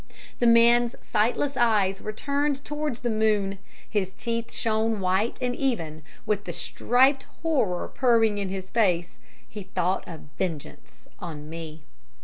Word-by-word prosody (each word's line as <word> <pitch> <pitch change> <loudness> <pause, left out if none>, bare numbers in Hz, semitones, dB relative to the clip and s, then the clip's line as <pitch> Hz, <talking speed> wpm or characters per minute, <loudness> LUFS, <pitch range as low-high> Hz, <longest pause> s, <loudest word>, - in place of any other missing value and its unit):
"The 240 - +3
man's 235 +1 +5
sightless 245 +6 0
eyes 210 -6 +2
were 215 - -4
turned 280 +4 -1
towards 295 -4 -3
the 240 - -1
moon, 210 -3 +1 0.3
his 190 -3 -1
teeth 230 +1 -3
shone 220 -1 0
white 190 +4 +1
and 245 0 -1
even; 165 - -2 0.2
with 210 -2 -1
the - - -4
striped 265 +3 +2 0.2
horror 255 - +1
purring 225 -5 +2
in 195 -2 -2
his 190 0 -6
face, 180 -7 +1 0.3
he 210 - -8
thought 185 -1 -1
of 165 -3 -8 0.2
vengeance 165 -6 -5
on 150 -4 -7
me. 160 -2 -8
215 Hz, 140 wpm, -26 LUFS, 190-240 Hz, 0.3 s, man's